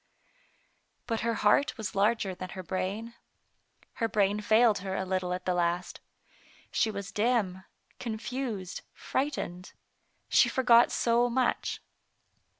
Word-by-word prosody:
But 225 -2 -1
her 230 0 0
heart 210 +8 +3
was 215 -4 -4
larger 200 -1 +1
than 185 0 -7
her 185 - -5
brain. 200 +6 -3 0.9
Her 230 - +3
brain 205 -1 +1
failed 220 +1 +4
her 190 0 -4
a 190 - -2
little 185 -1 -1
at 180 0 -3
the 185 - +1
last. 175 +1 -1 0.7
She 225 - +2
was 200 -1 -5
dim, 205 -4 0 0.3
confused, 225 -4 -4
frightened. 220 -10 -3 0.5
She - - +5
forgot 240 -2 +5
so 240 +1 +2
much. 250 +1 0
210 Hz, 125 wpm, -29 LUFS, 185-235 Hz, 0.9 s, She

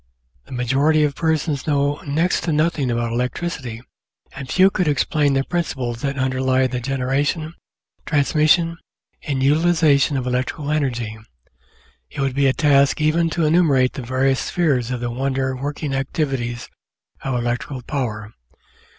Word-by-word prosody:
The - - -16
majority 135 +5 +2
of 145 -1 +1
persons 155 -2 -1
know 145 -1 +1
next 160 +5 0
to 170 - 0
nothing 150 -3 +1
about 120 -1 -1
electricity, 125 -1 -3 0.5
and 135 -2 -8
few 190 +1 +5
could 180 -4 0
explain 145 0 +1
the 135 0 +1
principles 130 -9 -3
that 140 -1 -2
underlie 130 0 +1
the 130 -1 -2
generation, 135 +5 -1 0.5
transmission, 155 +3 +2 0.4
and 135 -4 -2
utilisation 150 -1 +3
of 130 - -3
electrical 130 +4 -2
energy. 120 -7 -2 0.9
It - - -9
would 135 -1 0
be 140 +1 +2
a - - +4
task 140 -1 +3
even 160 +2 +2
to 165 0 0
enumerate 150 -6 +3
the 135 - -6
various 130 +2 +1
spheres 140 -9 0
of 125 -1 -3
the 120 0 -2
wonder 130 +1 -1
working 145 +2 -4
activities 135 -3 -2 0.5
of 135 -2 -2
electrical 120 +2 -3
power. 110 -7 -4
140 Hz, 140 wpm, -21 LUFS, 130-155 Hz, 0.9 s, few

